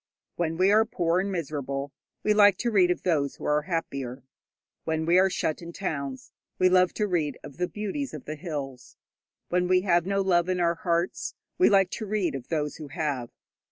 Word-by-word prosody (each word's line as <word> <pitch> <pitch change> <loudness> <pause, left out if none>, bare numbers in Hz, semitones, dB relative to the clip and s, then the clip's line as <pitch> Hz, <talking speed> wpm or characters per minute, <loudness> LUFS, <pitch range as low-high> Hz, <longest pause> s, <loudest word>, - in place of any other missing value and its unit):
When 165 -1 -1
we 190 +2 +4
are 215 +1 +6
poor 175 -5 0
and 195 +1 -1
miserable, 140 -5 -3 0.3
we 210 - +3
like 205 -2 +6
to 240 - -1
read 185 -4 +4
of 180 - -1
those 145 -6 +1
who - - -9
are 150 0 +2
happier. 140 -6 -4 0.6
When 160 0 -1
we 175 +2 +5
are 190 +1 +4
shut 160 -3 -2
in 170 0 -8
towns, 140 -9 -4 0.3
we 185 - +4
love 185 0 +4
to 210 - +1
read 160 -8 -1
of 140 - -11
the 180 0 0
beauties 215 - -4
of - - -9
the 155 - -4
hills. 145 -6 -6 0.5
When 180 0 +1
we 185 0 +4
have 175 -2 +2
no 195 0 +1
love 180 -2 +2
in 185 -1 0
our 170 -1 +3
hearts, 170 -1 -1 0.2
we 365 - +6
like 195 -2 +4
to 215 - -5
read 200 -3 0
of 135 -3 -6
those 150 -3 -2
who 155 - -8
have. 140 -6 -3
175 Hz, 205 wpm, -27 LUFS, 150-190 Hz, 0.6 s, are